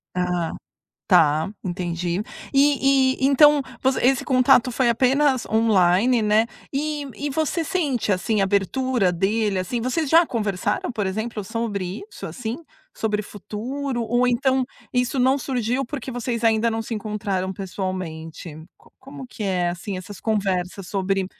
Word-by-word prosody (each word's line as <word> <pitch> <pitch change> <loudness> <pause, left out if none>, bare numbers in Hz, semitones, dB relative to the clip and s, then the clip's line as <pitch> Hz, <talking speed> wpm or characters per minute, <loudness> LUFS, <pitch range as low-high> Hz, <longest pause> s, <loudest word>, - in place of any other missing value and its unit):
Ah, 180 -2 -1 0.5
tá, 155 +3 +4 0.2
entendi. 175 0 -2 0.3
E 275 -1 +4
e 265 - +5
então, 290 +1 +6 0.2
voc 265 0 +2
esse 260 +1 +3
contato 255 -1 +4
foi 250 0 +2
apenas 260 +2 +2
online, 220 +1 +3
né, 215 +2 +3 0.3
e 295 +1 -2
e 290 +5 -4
você 315 +3 0
sente 290 - -1
assim 200 +2 +1
abertura 200 +2 +1
dele 200 +2 0
assim? 230 +6 -3
Vocês 270 +5 -1
já 330 +1 +6
conversaram, 210 -1 -1
por 210 -5 -2
exemplo, 220 +2 -3
sobre 205 -4 -3
isso - - -8
assim? 235 +2 -5 0.3
Sobre 210 -1 -1
futuro 240 +6 -4
ou 240 +3 +1
então 260 +1 +2 0.3
isso 250 +1 0
não 260 +2 +3
surgiu, 250 0 -1
porque 265 -1 -6
vocês 240 -1 -3
ainda 225 0 +3
não 225 0 -2
se 230 - -7
encontraram 200 -3 -2
pessoalmente? 180 -4 -5 0.2
Co - - -23
como 270 0 -10
que 220 - -6
é, 180 -3 0
assim, 180 +3 -4
essas 185 +2 -8
conversas 195 -3 -1
sobre, 195 -1 0
225 Hz, 145 wpm, -23 LUFS, 190-260 Hz, 0.5 s, então